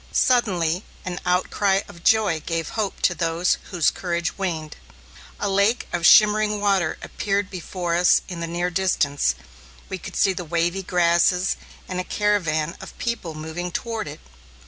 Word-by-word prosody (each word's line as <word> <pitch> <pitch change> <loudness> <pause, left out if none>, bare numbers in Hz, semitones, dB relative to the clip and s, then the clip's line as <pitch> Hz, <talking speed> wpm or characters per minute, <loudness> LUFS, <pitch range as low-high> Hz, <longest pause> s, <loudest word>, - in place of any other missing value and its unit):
Suddenly 185 -8 +2 0.2
an 180 -1 -4
outcry 190 +2 +2
of 170 - -14
joy 215 -7 +3
gave 165 0 -3
hope 215 -3 -3
to 180 - +3
those 170 +1 0
whose 175 -5 +2
courage 175 -1 -2
waned. 165 -5 -3 0.6
A 205 - -1
lake 200 +4 +2
of 175 0 +3
shimmering 210 0 +5
water 195 -5 +1
appeared 200 -1 -2
before 180 -1 -4
us 175 +1 +4
in 180 -3 -6
the 170 - -3
near 175 +2 -2
distance, 145 - +1 0.5
we - - -4
could - - -9
see 195 - +3
the 180 - -5
wavy 170 +3 0
grasses 180 +1 +2 0.3
and 180 -1 -3
a - - -1
caravan 170 -7 0
of - - -11
people 220 -9 -3
moving 160 +3 -5
toward 225 +3 -3
it. - - -9
180 Hz, 155 wpm, -23 LUFS, 170-200 Hz, 0.6 s, shimmering